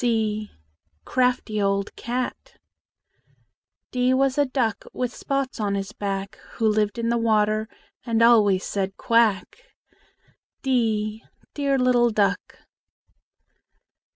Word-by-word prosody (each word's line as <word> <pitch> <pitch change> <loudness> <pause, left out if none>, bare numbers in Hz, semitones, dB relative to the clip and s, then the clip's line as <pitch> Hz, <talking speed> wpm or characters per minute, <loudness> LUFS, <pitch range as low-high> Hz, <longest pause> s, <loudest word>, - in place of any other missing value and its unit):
c 215 -3 0 0.6
Crafty 250 -4 0
old 200 0 -1
cat! 250 +2 -4 1.3
D 250 0 +2
was 270 0 +2
a 285 - +3
duck 240 -6 -1
With 250 -1 -3
spots 275 -3 -3
on 205 -2 0
his 195 0 -4
back, 195 -2 -4 0.2
Who 225 - 0
lived 210 0 +1
in 230 0 -1
the 235 0 +1
water, 215 -1 +1 0.3
And 230 -1 +1
always 210 -5 +5
said 195 -1 -3
"Quack!" 230 -4 +2 1.1
d 220 -4 0 0.3
Dear 280 -2 0
little 250 -2 +3
duck! 200 -2 -1
225 Hz, 110 wpm, -24 LUFS, 210-250 Hz, 1.3 s, always